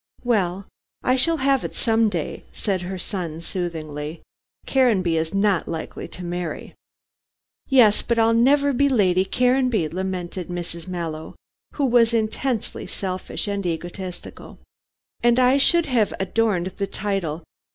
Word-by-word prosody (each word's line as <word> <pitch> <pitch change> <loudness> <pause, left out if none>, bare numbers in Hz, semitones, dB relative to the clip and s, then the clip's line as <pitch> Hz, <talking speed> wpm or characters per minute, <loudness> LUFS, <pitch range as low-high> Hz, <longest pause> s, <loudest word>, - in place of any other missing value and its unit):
"Well, 195 -6 0 0.4
I 255 - +3
shall 325 +6 +3
have 275 -2 +3
it - - -5
some 225 -2 +2
day," 170 -6 -4
said 195 -4 -2
her 185 +2 -5
son 175 -4 -4
soothingly. 160 -3 -5 0.4
"Caranby 210 -11 +2
is 160 0 -1
not 195 -2 +1
likely 160 -1 -5
to 180 - -9
marry." 175 -1 -4 1.0
"Yes, 240 -6 +5
but 235 - -1
I'll 225 0 +4
never 280 +4 +4
be 280 +3 +3
Lady 190 -7 +3
Caranby," 250 -5 +2
lamented 180 0 -4
Mrs. 175 -1 -5
Mallow, 165 -3 -5 0.4
who 285 - +1
was 235 -2 +4
intensely 225 +2 -2
selfish 185 +1 -4
and 200 -1 -2
egotistical. 175 +1 -6 0.6
"And 240 0 +4
I 255 +1 +5
should 340 +4 +4
have 240 -7 +1
adorned 190 -3 0
the 200 - -1
title. 190 -6 -3
195 Hz, 135 wpm, -23 LUFS, 175-240 Hz, 1.0 s, Yes